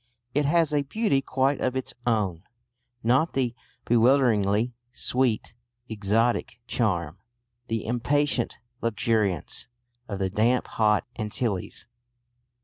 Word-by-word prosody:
It 145 +1 +2
has 160 0 +3
a 145 - +3
beauty 140 0 +1
quite 135 +1 0
of 130 0 0
its 130 - -3
own; 100 -8 +1 0.6
not 130 +8 +3
the 125 -3 0 0.3
bewilderingly 120 -2 +3 0.2
sweet, 125 -2 0 0.3
exotic 110 +2 0
charm, 90 -9 -1 0.5
the 115 -1 -2
impatient 125 +2 0 0.2
luxuriance, 105 -6 0 0.4
of 100 - -4
the 95 -1 -1
damp 115 +5 +2
hot 105 -1 +2
Antilles. 105 -2 -2
120 Hz, 105 wpm, -26 LUFS, 105-130 Hz, 0.6 s, has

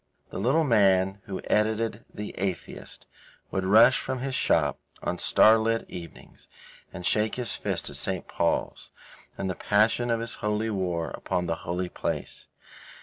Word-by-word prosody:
The - - -5
little 135 +10 +3
man 100 -6 +3
who 95 -2 -5
edited 110 +2 0
The 105 0 -6
Atheist 95 -3 -4 0.5
would 95 - -1
rush 110 +6 +6
from 130 0 -3
his 130 +1 -3
shop - - +2 0.2
on 90 0 -2
starlit 115 +1 +4
evenings 85 -2 -11 0.4
and 90 -1 -7
shake 110 +3 +1
his 125 -2 -2
fist - - -2
at - - -4
St. - - -2
Paul's - - -1 0.5
in - - -3
the 95 - -1
passion 110 +6 +2
of 115 -1 +1
his 115 0 -4
holy 105 +1 0
war 90 -4 -2
upon 90 -1 -2
the 85 -1 -1
holy 90 +1 -1
place. - - -4
105 Hz, 150 wpm, -27 LUFS, 95-115 Hz, 0.5 s, rush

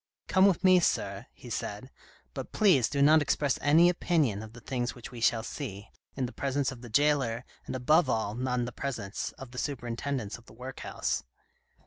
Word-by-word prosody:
" - - -57
Come 190 +1 +5
with 195 -2 +1
me, 185 -1 +7
sir," 175 - -1
he - - -12
said, - - -4 0.2
" - - -30
but - - -6
please 180 - +4
do 140 -1 +2
not 155 +2 +6
express 145 -1 +1
any 160 +4 +6
opinion 160 - +1
of 110 0 -10
the 120 - -11
things 120 0 -3
which 120 -1 -10
we 120 -2 -8
shall 115 -1 +3
see, 110 -6 -6 0.2
in 135 - -1
the 120 - -5
presence 140 0 -1
of 125 -3 -10
the 120 - -9
jailer, 130 -2 +2 0.2
and - - -4
above 150 +4 +3
all 110 -3 0
not 125 +2 -1
in 120 - 0
the 125 - -5
presence 115 -6 -4
of 135 -2 -11
the 125 - -5
superintendents 120 -3 -3
of 120 - -23
the - - -14
workhouse." 125 +3 -4
130 Hz, 205 wpm, -29 LUFS, 120-145 Hz, 0.2 s, me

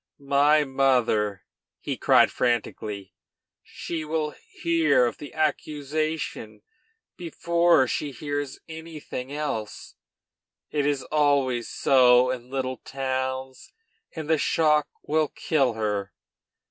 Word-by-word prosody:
"My 150 +2 +5
mother!" 125 -7 +1 0.4
he - - -3
cried - - +4
frantically, 105 -5 -2 0.5
"she 165 -2 -6
will 155 0 -2
hear 160 -7 +1
of 120 - -3
the 145 - -9
accusation 155 -7 -2 0.5
before 170 -3 +2
she 145 - -2
hears 145 +1 -4
anything 160 -5 -7
else, 145 -8 -4 0.8
it 145 -1 0
is 140 -3 0
always 140 -4 +1
so 125 -1 +4
in 125 -1 -6
little 130 -1 -3
towns; 130 0 -4 0.4
and 160 -2 -5
the 160 -1 +2
shock 150 -2 +2 0.2
will 155 0 +1
kill 135 -6 0
her. 105 -3 -2
140 Hz, 105 wpm, -25 LUFS, 125-155 Hz, 0.8 s, My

